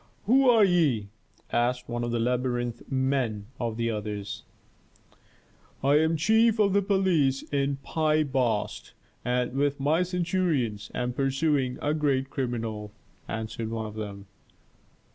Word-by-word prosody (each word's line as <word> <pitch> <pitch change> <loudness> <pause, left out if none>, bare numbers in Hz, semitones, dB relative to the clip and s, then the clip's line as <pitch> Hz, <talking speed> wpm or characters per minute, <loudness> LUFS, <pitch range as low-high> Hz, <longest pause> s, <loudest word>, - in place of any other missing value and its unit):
"Who 260 +4 +5
are 230 -3 +6
ye?" 150 - +2 0.4
asked 125 +1 0
one 120 0 -3
of 120 - -2
the 120 - 0
labyrinth 120 0 -1
men 130 -6 0
of 115 -2 -2
the 115 0 0
others. 105 -2 -4 1.4
"I 140 +2 +5
am 160 +1 +2
the - - 0
chief 220 +7 +4
of 200 -3 +3
police 170 -9 +2
in 140 0 +1
Pi 155 -1 +1
Bast, 125 -7 -1 0.3
and, 125 0 0
with 140 +1 0
my 150 +5 +2
centurions, 175 - -1
am 125 0 -1
pursuing 135 -1 0
a 150 - +1
great 135 -3 0
criminal," 115 -5 -3 0.4
answered 110 0 -4
one 110 -1 -3
of 105 - -7
them. 100 -2 -6
130 Hz, 135 wpm, -27 LUFS, 115-155 Hz, 1.4 s, are